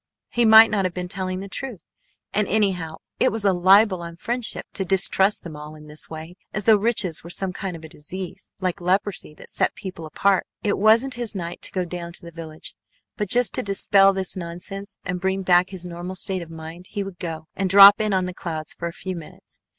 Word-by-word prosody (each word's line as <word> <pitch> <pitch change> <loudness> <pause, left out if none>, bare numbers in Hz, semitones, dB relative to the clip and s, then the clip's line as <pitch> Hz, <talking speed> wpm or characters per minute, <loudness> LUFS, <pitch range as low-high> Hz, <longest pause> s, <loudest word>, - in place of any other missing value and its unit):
He 240 -1 +1
might 220 0 +9
not 205 -2 +1
have 185 -2 -2
been 180 0 -4
telling 185 +1 -3
the 200 - -7
truth. 225 - -5 0.5
And 210 -1 +1
anyhow 185 -7 0 0.2
it 255 - +3
was 220 -1 -2
a 195 - +4
libel 190 +1 +5
on 170 0 -8
friendship 240 +6 -2
to 195 - -1
distrust 195 +2 +2
them 165 -3 -8
all 150 +1 -10
this 150 0 -5
way, 160 +3 -9 0.2
as 210 - -1
though 220 +1 +6
riches 205 -6 +1
were 170 - -10
some 185 +1 -3
kind 185 -1 -5
of 165 - -11
a - - -11
disease 175 +4 -8
like 185 -2 -2
leprosy 185 -3 -1
that - - -12
set - - 0
people 180 -4 -8
apart. 195 +4 +1 0.2
It 205 - 0
wasn't 225 +6 +4
his 230 -3 -2
night 175 -2 -5
to - - -2
go 185 -2 -1
down 170 0 -6
to - - -8
the 170 - -9
village, 160 -1 -8 0.4
but 210 -3 -3
just 245 -3 +4
to - - 0
dispel 195 0 +4
this 190 -1 -2
nonsense 180 +3 -7
and 180 -1 -3
bring 190 0 -1
back 180 0 +4
his 185 -2 -7
normal 175 +1 -6
state 185 0 -3
of 170 - -9
mind 165 +2 -10
he 205 -2 -3
would 195 -3 -9
go 160 -3 -5
and 190 -1 -1
drop 200 +2 +9
in 215 -1 0
on 185 -1 +1
the 180 - -5
Clouds 160 -4 -5
for 170 - -5
a 170 - -6
few 185 +1 -6
minutes. 165 -3 -12
185 Hz, 225 wpm, -23 LUFS, 170-200 Hz, 0.5 s, might